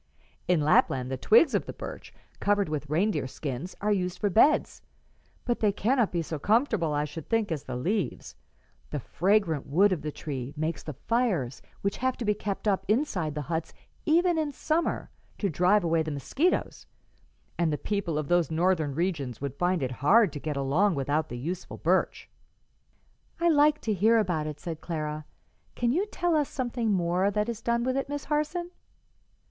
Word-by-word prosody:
"In 180 Hz, -3 st, +3 dB
Lapland 135 Hz, -3 st, +3 dB
the -, -, 0 dB
twigs 230 Hz, -, +5 dB
of -, -, 0 dB
the -, -, -5 dB
birch, -, -, -8 dB, 0.3 s
covered 205 Hz, -3 st, +1 dB
with 150 Hz, -1 st, -4 dB
reindeer 175 Hz, -1 st, +1 dB
skins, 140 Hz, +5 st, -5 dB
are 210 Hz, +1 st, +1 dB
used 180 Hz, -3 st, 0 dB
for 205 Hz, +1 st, 0 dB
beds, 280 Hz, -, +3 dB, 0.6 s
but 240 Hz, -1 st, 0 dB
they 210 Hz, -2 st, +3 dB
cannot 230 Hz, +3 st, +1 dB
be 170 Hz, -1 st, -1 dB
so 155 Hz, -1 st, -5 dB
comfortable, 215 Hz, -, +2 dB
I 145 Hz, 0 st, 0 dB
should 155 Hz, +1 st, -8 dB
think, 225 Hz, -4 st, +1 dB
as 150 Hz, -3 st, -3 dB
the 130 Hz, -, -5 dB
leaves. 185 Hz, -, -2 dB, 0.5 s
The 150 Hz, -, -3 dB
fragrant 175 Hz, -, +1 dB
wood 190 Hz, +8 st, +4 dB
of 175 Hz, -, -3 dB
the 150 Hz, -, -4 dB
tree 140 Hz, -2 st, -6 dB
makes 155 Hz, +2 st, -2 dB
the 155 Hz, -, -6 dB
fires 185 Hz, -, -1 dB, 0.2 s
which 200 Hz, 0 st, -1 dB
have 260 Hz, 0 st, 0 dB
to 240 Hz, -, -4 dB
be 210 Hz, -, +3 dB
kept 205 Hz, 0 st, -4 dB
up 195 Hz, -2 st, +2 dB
inside 195 Hz, -, 0 dB
the 150 Hz, -, -3 dB
huts 160 Hz, +2 st, -4 dB, 0.3 s
even 340 Hz, +1 st, +3 dB
in 305 Hz, -2 st, -1 dB
summer 315 Hz, +4 st, -1 dB, 0.3 s
to 200 Hz, -4 st, -1 dB
drive 180 Hz, +5 st, +3 dB
away 165 Hz, -1 st, +2 dB
the 160 Hz, -, -3 dB
mosquitoes, 265 Hz, -, -1 dB, 0.7 s
and 170 Hz, -2 st, +2 dB
the 150 Hz, -, -1 dB
people 200 Hz, -6 st, -2 dB
of 155 Hz, -2 st, -2 dB
those 175 Hz, -2 st, +2 dB
Northern 160 Hz, -3 st, +1 dB
regions 155 Hz, -7 st, -2 dB
would 140 Hz, -1 st, -4 dB
find 175 Hz, +1 st, 0 dB
it 130 Hz, -, -2 dB
hard 195 Hz, +3 st, +5 dB
to 145 Hz, -, -5 dB
get 150 Hz, -1 st, -3 dB
along 160 Hz, +8 st, +2 dB
without 145 Hz, +3 st, 0 dB
the 120 Hz, -, -5 dB
useful 170 Hz, +9 st, -5 dB
birch." -, -, 0 dB, 1.1 s
"I 340 Hz, 0 st, +3 dB
like 300 Hz, -1 st, +4 dB
to 220 Hz, -, 0 dB
hear 220 Hz, +4 st, +4 dB
about 175 Hz, -8 st, 0 dB
it," 150 Hz, -1 st, -6 dB
said 165 Hz, -1 st, -6 dB
Clara. 155 Hz, -2 st, -4 dB, 0.5 s
"Can 235 Hz, -1 st, +1 dB
you 370 Hz, +10 st, +1 dB
tell 350 Hz, -5 st, 0 dB
us 295 Hz, -2 st, +1 dB
something 240 Hz, -4 st, -1 dB
more 180 Hz, +1 st, +2 dB
that 210 Hz, +1 st, 0 dB
is 230 Hz, -1 st, -4 dB
done 235 Hz, +1 st, 0 dB
with 255 Hz, +1 st, 0 dB
it, 275 Hz, 0 st, -2 dB
Miss 290 Hz, 0 st, -3 dB
Harson?" 305 Hz, +4 st, -1 dB
185 Hz, 185 wpm, -28 LUFS, 155-230 Hz, 1.1 s, twigs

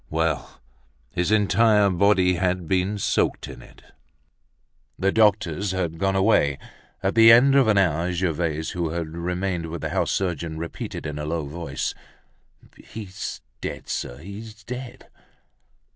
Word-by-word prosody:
Well! 80 Hz, -2 st, -2 dB, 0.5 s
his 90 Hz, +1 st, -1 dB
entire 105 Hz, -1 st, +4 dB
body 95 Hz, 0 st, +3 dB
had 90 Hz, -1 st, -1 dB
been 95 Hz, +4 st, 0 dB
soaked 100 Hz, -, 0 dB
in -, -, -10 dB
it. -, -, -17 dB, 1.1 s
The 95 Hz, +1 st, +1 dB
doctors 100 Hz, -4 st, +2 dB
had 85 Hz, -3 st, -2 dB
gone 95 Hz, +1 st, +1 dB
away. 95 Hz, -8 st, +3 dB, 0.5 s
At 95 Hz, -, +1 dB
the 115 Hz, 0 st, +8 dB
end 125 Hz, +4 st, +7 dB
of 135 Hz, -4 st, +5 dB
an 105 Hz, -2 st, +3 dB
hour 90 Hz, -2 st, +2 dB
Gervaise, 85 Hz, -3 st, -1 dB
who 85 Hz, -2 st, -2 dB
had 80 Hz, 0 st, -3 dB
remained 90 Hz, +1 st, -3 dB
with 80 Hz, 0 st, -6 dB
the -, -, -3 dB
house -, -, 0 dB
surgeon, 85 Hz, -4 st, -2 dB
repeated 80 Hz, -1 st, -6 dB
in 75 Hz, -1 st, -4 dB
a 75 Hz, -, -4 dB
low 80 Hz, 0 st, -2 dB
voice: 80 Hz, +4 st, -4 dB, 0.8 s
"He's 100 Hz, -4 st, -7 dB, 0.2 s
dead, -, -, -6 dB
sir; -, -, -4 dB
he's 105 Hz, +5 st, -10 dB
dead!" 125 Hz, +2 st, -8 dB
90 Hz, 145 wpm, -24 LUFS, 80-105 Hz, 1.1 s, the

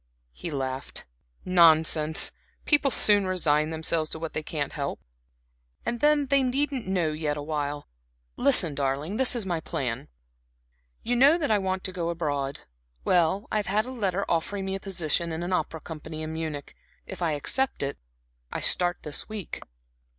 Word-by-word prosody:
He 170 Hz, -, -6 dB
laughed. 135 Hz, -3 st, -4 dB, 0.4 s
"Nonsense! 160 Hz, -3 st, +5 dB, 0.3 s
People 290 Hz, -2 st, +4 dB
soon 205 Hz, -6 st, +4 dB
resign 155 Hz, -4 st, +2 dB
themselves 160 Hz, 0 st, 0 dB
to -, -, -4 dB
what 160 Hz, 0 st, -5 dB
they -, -, -2 dB
can't 150 Hz, -2 st, -3 dB
help. -, -, -3 dB, 0.9 s
And 235 Hz, -, -2 dB
then 295 Hz, 0 st, +4 dB
they 275 Hz, 0 st, +3 dB
needn't 265 Hz, -2 st, -1 dB
know 180 Hz, -5 st, +1 dB
yet 150 Hz, -1 st, -2 dB
awhile. 145 Hz, -1 st, -3 dB, 0.5 s
Listen, 245 Hz, -, +3 dB
darling, 140 Hz, +7 st, -1 dB
this 260 Hz, -1 st, +3 dB
is 230 Hz, -4 st, -1 dB
my 175 Hz, -3 st, -1 dB
plan. -, -, -3 dB, 1.0 s
You 245 Hz, -, 0 dB
know 280 Hz, +7 st, +6 dB
that 295 Hz, -9 st, 0 dB
I 210 Hz, -, +4 dB
want 190 Hz, -1 st, -2 dB
to 190 Hz, -, -3 dB
go 175 Hz, -2 st, -2 dB
abroad 145 Hz, -5 st, -2 dB, 0.4 s
well, 180 Hz, +4 st, +2 dB
I -, -, +1 dB
have 210 Hz, -, -1 dB
had 210 Hz, +3 st, +1 dB
a 255 Hz, -, -6 dB
letter 200 Hz, -5 st, -1 dB
offering 190 Hz, +4 st, -1 dB
me 190 Hz, -, -2 dB
a 195 Hz, -, -3 dB
position 170 Hz, -3 st, 0 dB
in 160 Hz, +1 st, -3 dB
an 180 Hz, +1 st, -2 dB
opera 165 Hz, -2 st, -1 dB
company 155 Hz, -1 st, -7 dB
in 155 Hz, 0 st, -5 dB
Munich. 155 Hz, -3 st, -5 dB, 0.3 s
If -, -, -8 dB
I 165 Hz, -3 st, +1 dB
accept 250 Hz, -, 0 dB
it 140 Hz, 0 st, -3 dB, 0.5 s
I -, -, -2 dB
start 175 Hz, 0 st, +2 dB
this 150 Hz, +6 st, -3 dB
week." 215 Hz, -4 st, -6 dB
170 Hz, 170 wpm, -27 LUFS, 155-205 Hz, 1.0 s, know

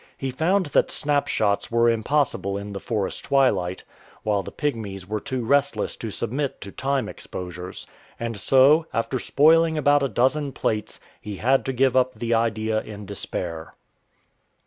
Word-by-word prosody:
He 135 Hz, -1 st, -3 dB
found 175 Hz, +8 st, +1 dB
that -, -, +3 dB
snapshots 140 Hz, -8 st, 0 dB
were 115 Hz, 0 st, +3 dB
impossible 115 Hz, -4 st, +1 dB
in 100 Hz, 0 st, -6 dB
the 100 Hz, -, -4 dB
forest 105 Hz, -3 st, -3 dB
twilight, 100 Hz, -10 st, +1 dB, 0.4 s
while 105 Hz, -2 st, +1 dB
the -, -, -8 dB
Pygmies 110 Hz, -10 st, -3 dB
were 105 Hz, +2 st, -3 dB
too 125 Hz, +2 st, -4 dB
restless 140 Hz, +2 st, +1 dB
to 115 Hz, -, -5 dB
submit 135 Hz, +7 st, -3 dB
to 100 Hz, -, -8 dB
time 135 Hz, +3 st, -1 dB
exposures. 90 Hz, 0 st, -7 dB, 0.3 s
And 115 Hz, -1 st, -3 dB
so, 140 Hz, -, +5 dB
after 120 Hz, +3 st, -1 dB
spoiling 160 Hz, +4 st, +4 dB
about 145 Hz, -1 st, +4 dB
a 140 Hz, -, 0 dB
dozen 135 Hz, +5 st, +1 dB
plates, 105 Hz, -2 st, -2 dB, 0.2 s
he 105 Hz, -1 st, -6 dB
had 130 Hz, +6 st, +2 dB
to 135 Hz, -, -1 dB
give 130 Hz, 0 st, +2 dB
up 130 Hz, -1 st, +2 dB
the 115 Hz, +1 st, -1 dB
idea 110 Hz, -1 st, +1 dB
in 105 Hz, -1 st, -9 dB
despair. 85 Hz, -4 st, -5 dB
120 Hz, 155 wpm, -24 LUFS, 105-140 Hz, 0.4 s, so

